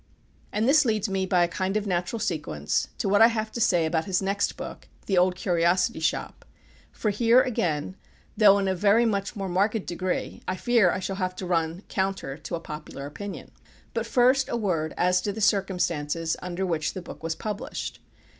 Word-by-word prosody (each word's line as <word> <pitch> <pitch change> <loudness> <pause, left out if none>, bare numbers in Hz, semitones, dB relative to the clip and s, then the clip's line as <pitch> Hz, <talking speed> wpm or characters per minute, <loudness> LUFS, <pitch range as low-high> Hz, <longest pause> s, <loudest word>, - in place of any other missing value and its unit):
And 215 +3 0
this 300 +3 +6
leads 215 -4 0
me, 190 -1 -1
by 180 -2 +3
a - - +2
kind 190 +4 -1
of 210 - -2
natural 180 +3 -1
sequence, 150 - -1
to - - -2
what 205 +2 +4
I 225 - +10
have 220 -2 -2
to 235 - -4
say 175 -8 +3
about 160 0 0
his 185 -2 +1
next 195 +1 -1
book, - - -8 0.2
"The 195 - 0
Old 180 0 +3
Curiosity 175 -1 +1
Shop;" 160 - -2 0.5
for 215 - -1
here, 235 +4 +5
again, 175 - -1 0.4
though 205 -2 +6
in 195 -1 0
a 190 - +2
very 205 +5 +3
much 200 -1 -1
more 195 -2 -3
marked 200 +4 0
degree, 180 +1 -3
I 185 - -1
fear 230 -2 +3
I - - 0
shall 190 +1 -4
have 185 -1 -2
to 185 - -5
run 170 +1 -1
counter 190 -8 -2
to 165 +3 -5
a - - -4
popular 150 -3 -8
opinion. 195 +8 -7 0.4
But 230 0 -2
first 255 +2 +3
a 235 - -1
word 165 -8 -1
as 180 0 +3
to 205 - -2
the 220 - -6
circumstances 170 -6 0
under 180 +1 -3
which 160 -4 -1
the 185 - -5
book - - -10
was 160 0 -2
published. 215 +5 -5
190 Hz, 200 wpm, -26 LUFS, 175-210 Hz, 0.5 s, I